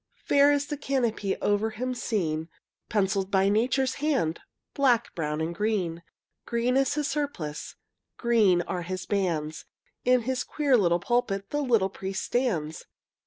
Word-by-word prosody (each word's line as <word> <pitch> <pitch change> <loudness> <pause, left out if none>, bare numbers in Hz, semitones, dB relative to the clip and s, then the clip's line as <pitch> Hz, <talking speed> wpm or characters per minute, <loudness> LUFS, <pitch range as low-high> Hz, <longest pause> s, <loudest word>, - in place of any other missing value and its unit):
Fair 285 0 +5
is 285 0 +1
the 295 - -4
canopy 240 -8 -1
Over 205 +2 +2
him 255 +4 -3
seen, 170 -10 -2 0.4
Penciled 195 -2 +1
by 195 0 +3
Nature's 255 +5 +2
hand, 260 - +1 0.3
Black, 245 -4 +2
brown, 150 -1 -2
and 165 +2 -2
green. 185 -4 -1 0.5
Green 240 +2 +1
is 270 +1 +2
his 300 -1 0
surplice, 275 - -4 0.4
Green 215 -7 +3
are 180 0 -3
his 185 +1 -5
bands; 165 -6 -1 0.4
In 250 0 +4
his 255 +1 -1
queer 290 -4 +1
little 175 -6 +3
pulpit 200 -3 -1
The 295 - 0
little 230 -8 +2
priest 190 0 -4
stands. 170 -12 -1
215 Hz, 145 wpm, -27 LUFS, 180-255 Hz, 0.5 s, Fair